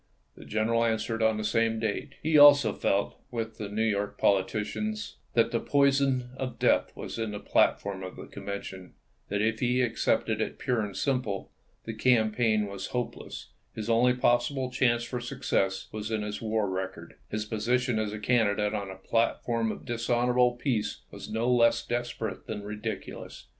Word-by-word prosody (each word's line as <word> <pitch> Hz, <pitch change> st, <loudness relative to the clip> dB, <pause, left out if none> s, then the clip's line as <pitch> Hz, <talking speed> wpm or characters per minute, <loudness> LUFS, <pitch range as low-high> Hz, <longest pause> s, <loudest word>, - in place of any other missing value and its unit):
The -, -, -13 dB
general 115 Hz, +2 st, +1 dB
answered 115 Hz, 0 st, -1 dB
on 110 Hz, -1 st, +3 dB
the 110 Hz, -, -3 dB
same 115 Hz, +1 st, +1 dB
date. 115 Hz, +6 st, -2 dB
He 160 Hz, +1 st, +1 dB
also 145 Hz, -7 st, +8 dB
felt, 100 Hz, +1 st, -1 dB
with 115 Hz, -2 st, -4 dB
the 105 Hz, -2 st, -4 dB
New 110 Hz, +2 st, -1 dB
York 105 Hz, -2 st, -1 dB
politicians, 155 Hz, -, 0 dB, 0.2 s
that 115 Hz, -1 st, +3 dB
the 115 Hz, -, +1 dB
poison 135 Hz, -3 st, +2 dB
of 130 Hz, -1 st, -4 dB
death -, -, +2 dB
was -, -, -6 dB
in 110 Hz, -1 st, -1 dB
the 105 Hz, -, -4 dB
platform 100 Hz, -1 st, +1 dB
of 95 Hz, -1 st, -7 dB
the -, -, -9 dB
Convention; 95 Hz, -2 st, -7 dB, 0.3 s
that 100 Hz, +1 st, 0 dB
if 110 Hz, 0 st, 0 dB
he 125 Hz, 0 st, +2 dB
accepted 115 Hz, -2 st, 0 dB
it -, -, -3 dB
pure 125 Hz, -3 st, 0 dB
and 100 Hz, -2 st, -5 dB
simple, 125 Hz, -8 st, -1 dB, 0.3 s
the 115 Hz, -, -5 dB
campaign 110 Hz, -1 st, +2 dB
was 100 Hz, -1 st, -6 dB
hopeless; 125 Hz, -1 st, -5 dB, 0.3 s
his 110 Hz, +1 st, -2 dB
only 125 Hz, +2 st, +4 dB
possible 125 Hz, +2 st, +1 dB
chance 120 Hz, -2 st, +2 dB
for 125 Hz, +1 st, -4 dB
success 120 Hz, -6 st, -1 dB
was 110 Hz, 0 st, -5 dB
in 110 Hz, -2 st, -1 dB
his 105 Hz, -1 st, -5 dB
war 110 Hz, -2 st, 0 dB
record; 95 Hz, 0 st, -5 dB
his 105 Hz, 0 st, -3 dB
position 120 Hz, +2 st, 0 dB
as 110 Hz, -1 st, -1 dB
a 105 Hz, -, -5 dB
candidate 105 Hz, -2 st, +1 dB
on 100 Hz, -2 st, -3 dB
a 95 Hz, -, -7 dB
platform 115 Hz, +2 st, 0 dB
of -, -, -8 dB
dishonorable 120 Hz, +1 st, +2 dB
peace 120 Hz, -4 st, -2 dB
was -, -, -9 dB
no 110 Hz, +2 st, -1 dB
less 120 Hz, -2 st, +4 dB
desper 120 Hz, -2 st, -2 dB
ate 95 Hz, -, -13 dB
than 105 Hz, -2 st, -5 dB
ridiculous. 105 Hz, +1 st, -6 dB
115 Hz, 175 wpm, -28 LUFS, 105-125 Hz, 0.3 s, also